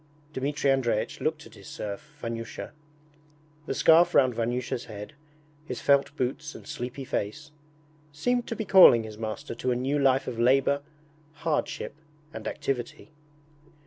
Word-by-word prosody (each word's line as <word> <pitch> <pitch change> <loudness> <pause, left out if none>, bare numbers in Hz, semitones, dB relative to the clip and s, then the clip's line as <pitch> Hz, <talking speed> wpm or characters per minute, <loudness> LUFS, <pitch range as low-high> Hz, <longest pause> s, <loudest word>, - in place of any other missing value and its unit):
Dmitri 140 +1 0
Andreich 125 -5 0
looked - - -2
at - - -15
his - - -14
serf, 125 +9 -7
Vanyusha. 115 0 -5 1.0
The - - -2
scarf 165 +2 +5
round 130 -2 +5
Vanyusha's 120 +1 -2
head, 105 +5 -8 0.5
his 125 - -4
felt 140 +1 +3
boots 140 +4 -3
and - - -11
sleepy 135 -2 -6
face, 145 +8 -4 0.6
seemed 240 +12 0
to 230 - -3
be 220 - -3
calling 180 - +8
his 110 -1 -9
master 110 -1 -4
to 125 +2 -3
a 125 - +2
new 135 +4 0
life 135 -1 +3
of 115 - -4
labour, 135 +3 +3 0.5
hardship, 160 -2 -2 0.4
and - - -6
activity. 130 +3 -4
130 Hz, 145 wpm, -27 LUFS, 120-150 Hz, 1.0 s, calling